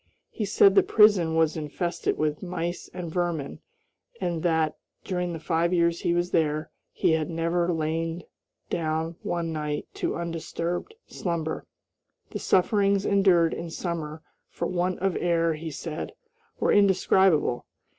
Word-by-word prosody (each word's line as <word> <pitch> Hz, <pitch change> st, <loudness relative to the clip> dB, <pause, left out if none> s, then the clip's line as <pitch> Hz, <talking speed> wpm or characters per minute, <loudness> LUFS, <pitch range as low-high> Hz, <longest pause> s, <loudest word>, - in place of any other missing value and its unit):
He 215 Hz, -, -3 dB
said 195 Hz, 0 st, +5 dB
the -, -, +7 dB
prison 200 Hz, -7 st, +4 dB
was 160 Hz, -1 st, +3 dB
infested 165 Hz, +3 st, -2 dB
with 155 Hz, -1 st, -1 dB
mice 175 Hz, -1 st, -4 dB
and 175 Hz, -3 st, -6 dB
vermin, 170 Hz, -5 st, -2 dB, 0.6 s
and 170 Hz, -2 st, -2 dB
that, 160 Hz, -2 st, +1 dB, 0.3 s
during 180 Hz, -2 st, -2 dB
the 165 Hz, -, -5 dB
five 170 Hz, +2 st, +1 dB
years 170 Hz, -1 st, +2 dB
he -, -, +1 dB
was 175 Hz, +1 st, 0 dB
there, 155 Hz, -1 st, 0 dB, 0.2 s
he -, -, +1 dB
had 160 Hz, 0 st, +1 dB
never 170 Hz, +1 st, 0 dB
lain 165 Hz, +1 st, -2 dB, 0.5 s
down 160 Hz, 0 st, -1 dB
one 170 Hz, -2 st, -2 dB
night 150 Hz, -1 st, -3 dB
to -, -, 0 dB
undisturbed 170 Hz, -, -4 dB
slumber. 165 Hz, -3 st, -3 dB, 0.6 s
The -, -, -4 dB
sufferings 200 Hz, +1 st, +2 dB
endured 185 Hz, -4 st, +4 dB
in 170 Hz, -, -5 dB
summer 160 Hz, -2 st, -4 dB, 0.3 s
for 170 Hz, -, -4 dB
want 180 Hz, +1 st, -1 dB
of 195 Hz, -2 st, +1 dB
air, 165 Hz, -1 st, +2 dB
he 160 Hz, +1 st, -6 dB
said, 155 Hz, +1 st, -5 dB, 0.5 s
were -, -, +2 dB
indescribable. 190 Hz, -8 st, +3 dB
170 Hz, 140 wpm, -26 LUFS, 160-180 Hz, 0.6 s, the